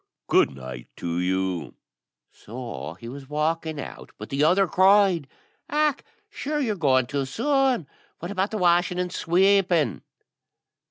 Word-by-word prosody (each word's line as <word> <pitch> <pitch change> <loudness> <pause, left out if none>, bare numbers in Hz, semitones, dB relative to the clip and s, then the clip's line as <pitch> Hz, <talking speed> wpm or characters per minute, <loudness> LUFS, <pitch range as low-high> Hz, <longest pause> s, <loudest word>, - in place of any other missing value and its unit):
Good - - +4
night 65 -2 -8
to 85 0 -3
you." 90 -3 -1 0.6
So 115 -8 -8
he 115 - -9
was 135 +2 -9
walking 155 +1 -1
out, - - -9
but - - -9
the 140 +2 0
other 185 +5 +4
cried, 190 -4 +4 0.4
"Och! 300 -1 +1 0.2
sure 300 +1 -3
your 230 -7 0
going 130 -7 +3
too 140 +2 -2
soon. 260 - +1 0.3
What 175 +3 -6
about 195 0 0
the 220 - -3
washing 175 -1 +2
and 180 0 -2
sweeping?" 175 - +2
165 Hz, 140 wpm, -25 LUFS, 130-195 Hz, 0.6 s, Good